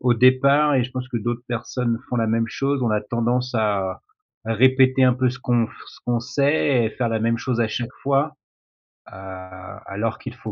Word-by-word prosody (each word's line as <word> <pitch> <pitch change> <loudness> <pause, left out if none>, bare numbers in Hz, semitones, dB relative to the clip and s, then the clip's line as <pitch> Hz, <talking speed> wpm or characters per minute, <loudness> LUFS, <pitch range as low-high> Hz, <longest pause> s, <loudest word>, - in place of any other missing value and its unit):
départ- 140 +4 +4
et 130 - +3
je 125 - -5
pense 130 0 -5
que 125 - -3
d'autres 120 +2 -3
personnes 120 0 -2
font - - -2
la 115 -2 +1
même 115 +1 +1
chose- 135 +3 -1
on 120 - +1
a 105 - +2
tendance 120 +3 -1
à 100 -4 0 0.4
à 115 - -1
répéter 130 +2 +4
un 125 -1 +5
peu 130 0 +1
ce 125 - -7
qu'on 120 -2 +1
f - - -16 0.2
ce - - -14
qu'on 120 -1 +1
sait 140 0 +1
et - - 0
faire 120 +1 -2
la 110 -1 0
même 115 +1 +1
chose 120 -1 -1
à 115 - +2
chaque 120 +3 -4
fois. 140 +3 +1 0.8
Heu, - - -11 0.7
alors 110 +3 -3
qu'il 130 - -7
faut 110 -3 -7
120 Hz, 210 wpm, -22 LUFS, 115-130 Hz, 0.8 s, un